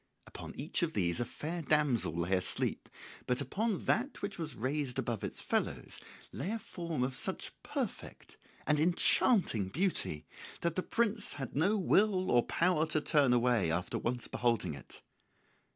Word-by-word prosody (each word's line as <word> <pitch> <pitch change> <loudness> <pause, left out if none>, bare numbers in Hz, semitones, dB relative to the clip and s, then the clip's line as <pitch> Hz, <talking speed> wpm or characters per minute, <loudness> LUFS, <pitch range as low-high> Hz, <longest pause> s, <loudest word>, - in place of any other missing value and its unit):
Upon - - -9
each 150 +7 -2
of 170 -2 0
these 85 -4 0
a 120 - 0
fair 165 +8 -5
damsel 145 - +2
lay 85 +2 -1
asleep; 90 -1 +1 0.4
but 125 0 +1
upon 200 - -2
that 255 +1 0
which 200 -2 -4
was 155 -5 -4
raised 130 +1 -2
above 115 -4 -2
its - - -3
fellows - - -2 0.3
lay 185 - -4
a 225 - -1
form 170 - -4
of 130 +1 -1
such 130 - -2
perfect - - -5 0.3
and 150 0 +2
enchanting 170 - +3
beauty 165 - -1 0.4
that 170 -1 0
the 185 - 0
prince 220 0 0
had 135 -3 -6
no 185 +9 +3
will 195 0 +3
or 120 - +5
power 165 +3 +1
to 155 - +1
turn 145 -3 +3
away 120 -6 +3
after 85 +2 -1
once 120 0 -2
beholding 115 -9 0
it. 70 - -12
150 Hz, 160 wpm, -33 LUFS, 120-180 Hz, 0.4 s, or